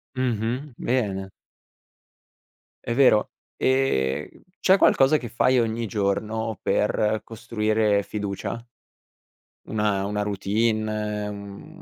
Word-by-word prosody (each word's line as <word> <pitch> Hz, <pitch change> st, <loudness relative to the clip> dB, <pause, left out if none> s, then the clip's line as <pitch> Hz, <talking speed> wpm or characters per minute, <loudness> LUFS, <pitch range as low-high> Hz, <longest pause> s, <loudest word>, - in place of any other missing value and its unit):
Mh-mh, 125 Hz, +2 st, -2 dB
bene. 100 Hz, -6 st, -1 dB, 1.5 s
È 115 Hz, -, -2 dB
vero, 120 Hz, -4 st, +4 dB, 0.3 s
ehm, 75 Hz, -, +1 dB, 0.3 s
c'è 190 Hz, +1 st, +5 dB
qualcosa 145 Hz, -3 st, +5 dB
che 120 Hz, -, -7 dB
fai 125 Hz, +2 st, +3 dB
ogni 115 Hz, 0 st, -1 dB
giorno 105 Hz, +2 st, -1 dB
per 105 Hz, 0 st, +1 dB
costruire 110 Hz, -2 st, 0 dB
fiducia, 100 Hz, 0 st, -4 dB, 1.1 s
una 105 Hz, -2 st, 0 dB
una 105 Hz, +1 st, -2 dB
routine, 105 Hz, +1 st, -1 dB
un 100 Hz, -1 st, -9 dB
110 Hz, 90 wpm, -24 LUFS, 100-115 Hz, 1.5 s, c'è